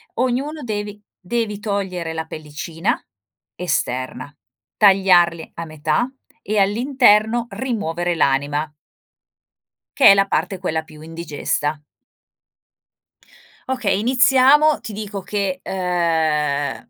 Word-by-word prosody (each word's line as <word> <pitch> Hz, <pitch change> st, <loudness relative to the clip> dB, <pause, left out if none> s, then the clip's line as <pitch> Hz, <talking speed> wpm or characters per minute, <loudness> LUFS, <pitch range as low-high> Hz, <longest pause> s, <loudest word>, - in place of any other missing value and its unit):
Ognuno 265 Hz, +5 st, -1 dB
devi 205 Hz, -2 st, -5 dB, 0.2 s
devi 210 Hz, +1 st, -3 dB
togliere 190 Hz, -6 st, -3 dB
la 160 Hz, 0 st, -4 dB
pellicina 155 Hz, +1 st, -4 dB, 0.6 s
esterna, 130 Hz, -5 st, -3 dB, 0.4 s
tagliarli 180 Hz, -5 st, +4 dB
a 170 Hz, -, -5 dB
metà 155 Hz, -, -1 dB, 0.3 s
e 215 Hz, +1 st, -2 dB
all'interno 230 Hz, +1 st, +3 dB
rimuovere 175 Hz, -9 st, -2 dB
l'anima. 145 Hz, +1 st, 0 dB, 1.3 s
Che -, -, +5 dB
è -, -, +11 dB
la 195 Hz, 0 st, +3 dB
parte 180 Hz, +2 st, -1 dB
quella 160 Hz, -3 st, -2 dB
più 155 Hz, -1 st, -15 dB
indigesta. 155 Hz, -2 st, -3 dB, 1.9 s
Okay, 225 Hz, -7 st, 0 dB
iniziamo, 265 Hz, +5 st, +4 dB
ti 215 Hz, -, -8 dB
dico 205 Hz, -1 st, -5 dB
che, 190 Hz, -1 st, -2 dB
ehm, 160 Hz, -6 st, -1 dB
185 Hz, 95 wpm, -20 LUFS, 160-215 Hz, 1.9 s, è